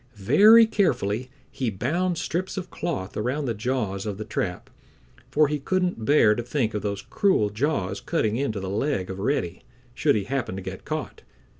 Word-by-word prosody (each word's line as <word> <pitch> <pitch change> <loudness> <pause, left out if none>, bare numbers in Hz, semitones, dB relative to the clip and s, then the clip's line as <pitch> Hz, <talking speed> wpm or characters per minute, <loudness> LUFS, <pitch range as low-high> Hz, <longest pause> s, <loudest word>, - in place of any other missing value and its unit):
Very 215 - +7
carefully 130 - 0 0.2
he 130 -3 -2
bound 165 - -1
strips 180 +5 -3
of 185 -1 -5
cloth 145 - -4
around 130 +7 -1
the 120 - -1
jaws 110 -3 -2
of 100 -2 -3
the 110 - -5
trap, 90 -4 -4 0.6
for 150 0 +4
he 150 +1 -2
couldn't 180 -6 -1
bear 115 -6 +5
to 120 - -2
think 120 -2 -1
of 105 - -2
those 100 -1 -3
cruel 190 - +1
jaws 105 -5 -1
cutting 110 0 0
into 120 -5 -1
the 95 - -5
leg 100 -1 -1
of 95 - -7
Reddy, 95 -6 -1 0.3
should 145 +3 +2
he 105 - 0
happen 130 -4 -3
to 95 - -5
get 95 0 -7
caught. - - -4
120 Hz, 180 wpm, -25 LUFS, 100-150 Hz, 0.6 s, Very